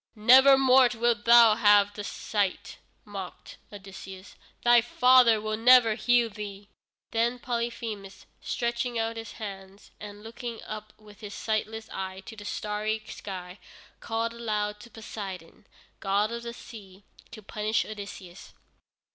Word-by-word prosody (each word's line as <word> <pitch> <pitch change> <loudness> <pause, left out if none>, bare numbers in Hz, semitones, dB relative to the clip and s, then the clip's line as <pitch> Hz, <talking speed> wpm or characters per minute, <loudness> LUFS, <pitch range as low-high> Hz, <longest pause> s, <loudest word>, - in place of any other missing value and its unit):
"Never 260 +5 +7
more 260 -1 +5
wilt 230 -2 0
thou 235 -1 +8
have 205 -2 +4
thy 205 - -7
sight," 205 -1 -3 0.3
mocked 195 -3 -9
Odysseus; 195 -1 -11 0.3
"thy 240 0 +6
father 245 -1 +5
will 215 0 -3
never 235 -1 +6
heal 240 +1 +2
thee." 205 -1 -9 0.4
Then 235 +2 0
Polyphemus, 230 -5 -5 0.2
stretching 235 0 -2
out 225 0 -2
his 225 0 -8
hands, 195 -2 -10
and 205 0 -10
looking 230 0 -7
up 215 0 -8
with 210 -1 -17
his 205 -2 -8
sightless 220 0 -3
eye 190 0 -5
to 220 +3 -11
the 205 -1 -11
starry 215 +1 -3
sky, 185 -1 -8 0.4
called 230 0 -3
aloud 210 -3 -3
to 235 - -13
Poseidon, 195 -6 -9 0.3
god 200 +3 0
of 235 0 -5
the 235 0 -7
sea, 200 -5 -13 0.3
to 215 - -12
punish 215 +1 -1
Odysseus. 200 -4 -10
215 Hz, 135 wpm, -27 LUFS, 205-235 Hz, 0.4 s, thou